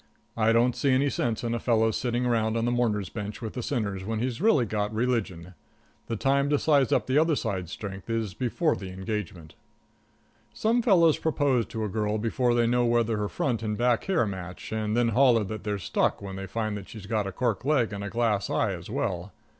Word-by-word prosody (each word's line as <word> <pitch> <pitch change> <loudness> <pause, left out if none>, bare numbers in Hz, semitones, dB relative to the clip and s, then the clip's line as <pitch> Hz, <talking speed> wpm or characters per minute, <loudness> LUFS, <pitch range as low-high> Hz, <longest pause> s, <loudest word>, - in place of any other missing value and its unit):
I 115 0 +3
don't 120 +2 +3
see 140 - 0
any 135 +2 +3
sense 115 -3 -1
in 115 0 -1
a 120 - -1
fellow's 110 -2 +2
sitting 120 0 -1
around 115 -2 +1
on 115 - 0
the 120 - +1
mourner's 110 -6 0
bench 105 -1 -6
with 110 -2 -6
the 125 - -4
sinners, 105 -7 -2
after 110 +4 -3
he's 120 +4 -2
really 170 - +4
got 105 0 -2
religion. 110 -7 -2 0.5
The 115 - -2
time 140 +4 +1
to 145 - +3
size 140 -5 +3
up - - +2
the 130 +3 +3
other 160 0 +3
side's 95 - -3
strength 100 0 -7
is 115 -4 -1
before 135 - 0
the 95 - -7
engagement. 95 -4 -5 1.0
Some 230 +2 +2
fellows 175 - +4
propose 140 -8 +1
to 110 - -4
a - - -1
girl 105 +1 -1
before 120 +2 +1
they 120 -1 +3
know 120 +1 +2
whether 115 -2 +2
her 105 -1 -2
front 120 -5 -1
and 110 -1 -2
her - - -4
back 120 0 +2
hair 185 -10 +2
match, 95 -3 -7
and 110 0 -1
then 120 -1 +3
holler 120 -1 +4
that 110 +1 -6
they're 105 -1 -2
stuck 95 - 0
when 95 -1 -7
they 95 0 -6
find 110 -1 -2
that 100 - -10
she's 110 -3 -9
got 105 -1 -1
a - - -4
cork 115 +1 -1
leg 130 -7 +1
and 100 0 -5
a 100 - -4
glass 110 -4 0
eye - - +1
as - - -8
well. 90 +3 -2
115 Hz, 225 wpm, -27 LUFS, 105-125 Hz, 1.0 s, really